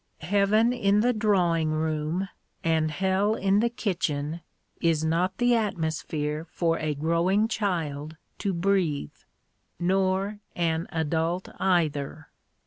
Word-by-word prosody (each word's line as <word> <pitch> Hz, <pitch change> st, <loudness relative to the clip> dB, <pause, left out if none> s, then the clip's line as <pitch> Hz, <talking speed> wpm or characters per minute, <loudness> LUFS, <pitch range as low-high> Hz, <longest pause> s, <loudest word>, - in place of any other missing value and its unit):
Heaven 205 Hz, +7 st, +3 dB
in 205 Hz, -3 st, +2 dB
the 245 Hz, +2 st, +3 dB
drawing 180 Hz, -7 st, +2 dB
room 155 Hz, +3 st, -1 dB, 0.4 s
and 160 Hz, -1 st, +2 dB
hell 190 Hz, +6 st, +1 dB
in 195 Hz, 0 st, +2 dB
the 235 Hz, +2 st, +2 dB
kitchen 170 Hz, -8 st, -2 dB, 0.4 s
is 160 Hz, -2 st, +2 dB
not 175 Hz, +4 st, 0 dB
the 245 Hz, 0 st, +3 dB
atmosphere 160 Hz, -7 st, -1 dB
for 165 Hz, -1 st, 0 dB
a 155 Hz, -1 st, -1 dB
growing 170 Hz, +8 st, +2 dB
child 160 Hz, -8 st, -2 dB, 0.2 s
to 200 Hz, -, 0 dB
breathe 175 Hz, -, 0 dB, 0.7 s
nor 190 Hz, +3 st, +1 dB, 0.2 s
an 165 Hz, -1 st, 0 dB
adult 165 Hz, +2 st, -1 dB
either. 155 Hz, -5 st, 0 dB
170 Hz, 115 wpm, -27 LUFS, 155-200 Hz, 0.7 s, Heaven